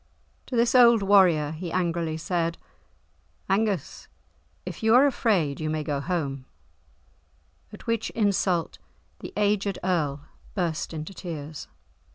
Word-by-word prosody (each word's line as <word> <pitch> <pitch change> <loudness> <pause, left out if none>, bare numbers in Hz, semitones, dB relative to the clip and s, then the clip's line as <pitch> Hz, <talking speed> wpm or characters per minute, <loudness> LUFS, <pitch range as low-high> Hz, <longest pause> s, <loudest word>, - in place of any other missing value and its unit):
To 255 - -4
this 235 0 +3
old 235 -4 +6
warrior 180 -7 +4
he 165 +2 -6
angrily 170 -3 -1
said, 170 0 -1 0.9
"Angus, 195 -5 -1 0.6
if - - -7
you 220 +1 +4
are 265 +3 +7
afraid, 195 - +1
you 155 - -2
may 155 0 -2
go 145 -1 -2
home," 140 -5 -3 1.3
at - - -12
which 230 -1 -1
insult 195 -5 0 0.4
the - - -8
aged 205 -2 +1
Earl 155 -6 0 0.3
burst 170 -5 -2
into 155 +3 -6
tears. 160 -4 -7
175 Hz, 125 wpm, -26 LUFS, 155-205 Hz, 1.3 s, are